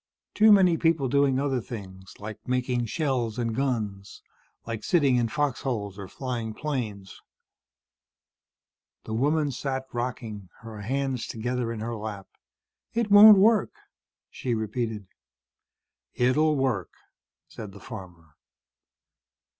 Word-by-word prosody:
"Too 215 +1 +6
many 185 -5 +6
people 160 -5 +2
doing 140 0 +2
other 135 -3 0
things, 95 -4 -9
like 105 0 -9
making 125 -1 0
shells 125 -6 -1
and 115 -2 -1
guns, 110 -7 -3 0.4
like 115 -2 -5
sitting 140 -8 +3
in 120 -1 +1
fox 145 +2 -1
holes 105 -6 -3
or 100 - -7
flying 115 -2 -5
planes." 110 -10 -5 1.8
The 110 - -6
woman 145 +5 +1
sat 130 +1 -3
rocking, 115 -5 -5
her 110 -2 -9
hands 135 +2 -2
together 120 +1 -2
in 115 -2 -5
her 115 +1 -3
lap. 105 -3 -6 0.7
"It 230 -3 0
won't 205 0 +10
work," 215 +2 +3 0.6
she 125 -3 -2
repeated. 110 -1 -3 1.1
"It'll 150 +5 +3
work," 130 - 0 0.6
said 105 -2 -9
the 100 - -13
farmer. 90 -8 -11
120 Hz, 120 wpm, -26 LUFS, 110-140 Hz, 1.8 s, won't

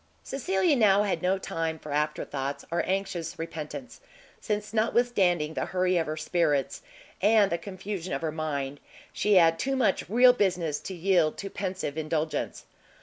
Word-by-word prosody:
Cecilia 190 -3 +1
now 205 -4 +4
had 205 - -1
no 185 +1 +2
time 165 -3 -3
for 150 -1 -9
afterthoughts 145 -2 -2
or 170 - +1
anxious 190 -3 -2
repentance, 165 - -7 0.4
since 210 0 -3
notwithstanding 205 -8 +2
the - - -2
hurry 185 0 +1
of 165 - 0
her 155 +1 -3
spirits, 155 -5 0 0.4
and 205 0 +4
the 170 - 0
confusion 190 0 -6
of - - -2
her 160 - -1
mind, 145 -3 -3 0.3
she 210 -1 +2
had 165 -2 +5
too 270 0 0
much 240 -9 +1
real 245 +4 +7
business, 180 - 0
to 190 - -7
yield 175 -3 +2
to 195 -1 -6
pensive 185 -6 -3
indulgence. 155 0 -2
180 Hz, 155 wpm, -27 LUFS, 155-200 Hz, 0.4 s, real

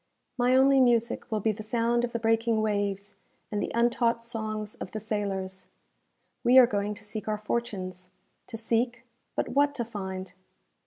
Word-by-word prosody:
My 250 +1 +3
only 270 +1 +6
music 235 -2 +2
will 215 -1 0
be 220 - +2
the 215 +1 -7
sound 235 +2 +1
of 240 - -1
the 235 - -1
breaking 225 -1 +2
waves, 205 -1 -1 0.4
and 205 -1 -1
the - - -2
untaught 235 0 +2
songs 215 -2 -4
of - - -8
the 215 - -3
sailors. 195 -3 -3 0.8
We 250 +1 +6
are 255 - +10
going 205 -2 -2
to 210 - -12
seek 215 0 -6
our 215 -1 0
fortunes 190 -5 -4 0.4
to 225 - -6
seek, 230 +2 0 0.3
but - - -1
what 285 +2 +2
to 235 - -2
find? 190 -4 -6
220 Hz, 170 wpm, -28 LUFS, 205-235 Hz, 0.8 s, are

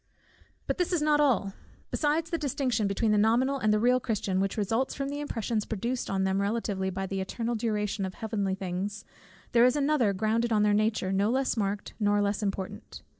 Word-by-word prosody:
But - - -2
this 360 - +1
is 340 -4 +1
not 300 -1 +3
all 235 -9 +2 0.4
besides 315 +2 0
the 335 - -1
distinction 260 -7 0
between 210 +2 +1
the 210 - +3
nominal 250 +6 +2
and 215 -3 +2
the 215 - +4
real 250 +3 +3
Christian, 205 -6 -1
which 195 +2 -1
results 225 +5 0
from 275 -1 -3
the 290 +1 -4
impressions 230 -6 -2
produced 235 +5 -3
on 190 -1 0
them 190 +1 +1
respectively 200 -2 -1
by 190 +1 -3
the 195 0 -3
eternal 230 +5 -3
duration 210 -3 -1
of 190 -1 -4
heavenly 205 -4 -2
things, 195 +3 -4 0.5
there 235 0 +5
is 250 +2 +5
another 285 -7 +2
grounded 220 +4 0
on 210 -1 +3
their 210 0 +3
nature, 215 -2 +1
no 200 +2 +2
less 260 +1 +1
marked, 200 -2 -2
nor 205 -1 +2
less 205 +1 0
important. 195 -2 -5
215 Hz, 200 wpm, -28 LUFS, 200-250 Hz, 0.5 s, there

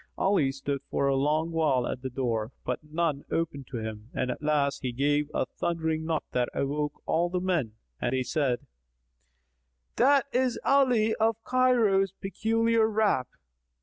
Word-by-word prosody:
Ali 190 -9 +2
stood 140 0 -3
for 140 - +1
a 135 - +2
long 155 +4 +1
while 150 -7 +2
at 125 - -4
the 130 - -4
door, 115 -3 -2
but 125 - -1
none 155 -2 -1
opened 145 -5 -2
to 125 - -5
him; 110 0 -6
and 125 0 0
at - - -6
last 150 -2 +1
he 125 - -2
gave 145 +4 +1
a - - 0
thundering 160 0 -2
knock 160 -1 -1
that 125 -1 0
awoke 145 +1 -2
all 170 +2 +1
the 180 +1 -1
men 175 -12 0 0.3
and 120 - 0
they 130 0 0
said, 130 -3 -1 1.3
"That 275 +1 +5
is 255 -1 +1
Ali 250 -6 +4
of 225 0 +1
Cairo's 230 -7 +3
peculiar 225 +3 +1
rap." 210 - +1
155 Hz, 160 wpm, -28 LUFS, 135-205 Hz, 1.3 s, That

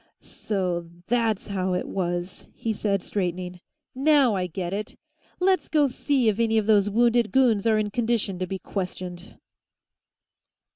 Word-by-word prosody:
"So 180 -5 -3 0.2
that's 225 -2 0
how 185 -2 -1
it 180 - -2
was!" 175 -1 -3
he 225 - -2
said, 200 -2 -1
straightening. 180 -2 -3 0.3
"Now 275 -3 +4
I 185 -2 -1
get 180 +1 -4
it! 210 +2 -4 0.4
Let's 375 +1 +2
go 300 -2 +4
see 265 -1 +1
if 215 0 +2
any 225 -1 +2
of 215 - +2
those 205 -2 +4
wounded 235 +1 +3
goons 235 -6 +3
are 220 -1 +4
in 210 -1 -1
condition 225 -5 0
to 185 - -2
be 190 - -3
questioned." 180 -1 -6
205 Hz, 150 wpm, -25 LUFS, 185-235 Hz, 0.4 s, Now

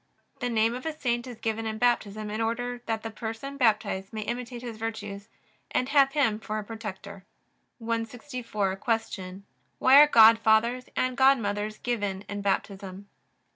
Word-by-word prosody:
The 245 - -1
name 225 0 +2
of 255 +5 -5
a 310 -1 -4
saint 240 -2 -1
is 245 -3 -8
given 225 0 -2
in 220 0 -3
Baptism 215 -3 0
in 215 +2 -3
order 245 +2 -2
that 225 -1 -2
the 225 - -5
person 225 +5 -6
baptized 215 -6 +1
may 220 - -4
imitate 245 +1 -5
his 235 -3 -6
virtues 210 -2 -6 0.4
and 255 - -1
have 275 -2 +4
him 225 -8 +2
for 215 0 -4
a 215 - -3
protector. 200 -3 -8 0.5
164. 230 -3 -3
Q. 195 -4 -3 0.3
Why 265 +2 +7
are 300 - +8
godfathers 225 0 +5
and 255 0 0
godmothers 215 -5 +2
given 205 -5 -2
in 205 0 -6
Baptism? 195 0 -3
225 Hz, 155 wpm, -27 LUFS, 210-245 Hz, 0.5 s, are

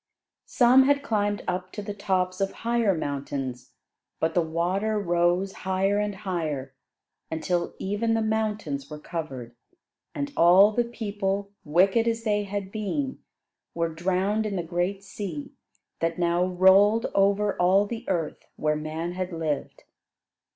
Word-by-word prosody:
Some 255 +1 +5
had 280 0 +2
climbed 205 -5 0
up 185 0 -2
to 210 - -5
the 205 0 -5
tops 185 -2 -1
of 195 - +1
higher 230 -5 +2
mountains, 135 -4 -4 0.5
but 160 0 0
the 175 - +3
water 180 +7 0
rose 175 +1 +1
higher 190 +2 +1
and 210 -1 -1
higher, 160 -9 -3 0.6
until 170 +2 -2
even 210 +4 0
the 225 - +1
mountains 210 -11 -2
were 150 - -7
covered 135 -7 -6 0.6
and 285 0 -3
all 185 +5 +7
the 240 +2 +1
people, 200 -3 -3
wicked 190 +9 +3
as 230 0 0
they 210 -2 +1
had 200 -1 -4
been, 260 +6 -3 0.6
were 165 -1 -1
drowned 190 +5 0
in 200 - -3
the 175 - -1
great 175 +4 -2
sea 175 -9 -6 0.5
that 165 0 -1
now 175 0 +2
rolled 190 +4 +5
over 200 +1 +2
all 190 +3 +4
the 225 +2 -6
earth 170 -5 -2
where 150 0 0
man 155 +3 -4
had 185 +1 -4
lived. 160 -3 -3
190 Hz, 145 wpm, -26 LUFS, 170-210 Hz, 0.6 s, all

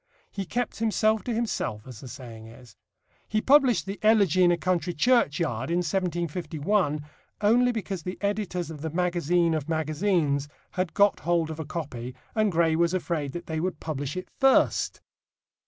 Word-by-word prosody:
He 195 -1 -4
kept 240 +5 -2
himself 220 -1 +2
to 245 - -2
himself, 220 - -2
as 125 -4 -10
the 130 - -9
saying 115 -3 -10
is. 115 -1 -15 0.5
He 215 - +1
published 260 -5 +4
the 195 +1 -5
Elegy 200 -5 +4
in 175 - +5
a 175 - +2
Country 175 0 -1
Churchyard 160 - +1
in 170 - +1
1751 170 -2 -1 0.4
only 240 +4 +4
because 200 -5 -4
the 180 +4 -5
editors 200 -5 -2
of 150 -3 -9
the 160 - -3
Magazine 175 0 +1
of 155 -1 -3
Magazines 155 -2 0 0.2
had 185 -2 -2
got 205 -1 +4
hold 165 0 0
of 160 - -7
a 160 - -4
copy 130 -6 -6 0.2
and 215 -2 +2
Gray 165 -1 +2
was 170 +2 +2
afraid 160 -6 -2
that 175 - -6
they 160 -1 -3
would 180 -1 -2
publish 145 -1 -4
it 185 - -5
first. 270 -1 +3
175 Hz, 170 wpm, -26 LUFS, 155-200 Hz, 0.5 s, in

